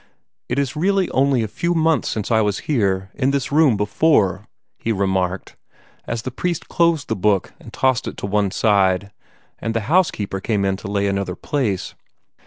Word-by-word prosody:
"It 125 - -1
is 140 0 -1
really 190 +3 +1
only 135 -3 +2
a - - -2
few 170 - -1
months 160 -1 +2
since 110 +1 -3
I 110 -1 +4
was 105 -2 0
here, 95 -8 0
in 135 0 0
this 140 -1 -1
room, 145 -7 +4
before," 105 - +2 0.3
he 115 - -1
remarked, 95 -2 -1 0.5
as 115 -1 -3
the 130 - -4
priest 170 +5 -3
closed 170 -4 +1
his 110 - -2
book 100 -1 +1
and - - -12
tossed 130 -3 +1
it - - -6
to - - -4
one 100 0 +1
side, 100 -1 +2 0.5
and 115 0 -3
the 115 - +1
housekeeper 110 - +1
came 100 -1 0
in 95 0 +1
to 95 - -8
lay 100 0 0
another 100 -2 -1
place. 105 - -2
110 Hz, 185 wpm, -21 LUFS, 100-140 Hz, 0.5 s, I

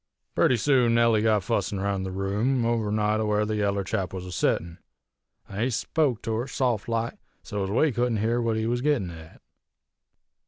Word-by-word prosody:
"Purty 125 - +3
soon 125 -2 +3
Nellie 115 -2 +4
got 110 -3 +2
fussin' 100 -2 -1
roun' 100 0 -1
the 95 - -3
room, 105 +7 0
over 115 -3 0
nigh 105 0 +1
to 110 - 0
where 105 0 +1
the 110 0 -2
yaller 100 -1 0
chap 95 -1 -3
was 90 -1 -5
a 90 - -7
settin', 85 +1 -1 0.7
an' 100 +2 -5
he 125 - +2
spoke 130 0 0
to 115 - -2
her, 120 +3 -2
saft 120 -6 -1
like, 115 0 -2 0.2
so 105 -1 -3
ez 95 - -3
we 135 +9 +2
couldn't 120 -1 0
hear 115 +3 +1
what 115 -1 0
he 110 - -1
was 120 +2 0
a - - -6
gittin' 125 -13 +1
at. 80 -1 -12
110 Hz, 205 wpm, -26 LUFS, 100-120 Hz, 0.7 s, Nellie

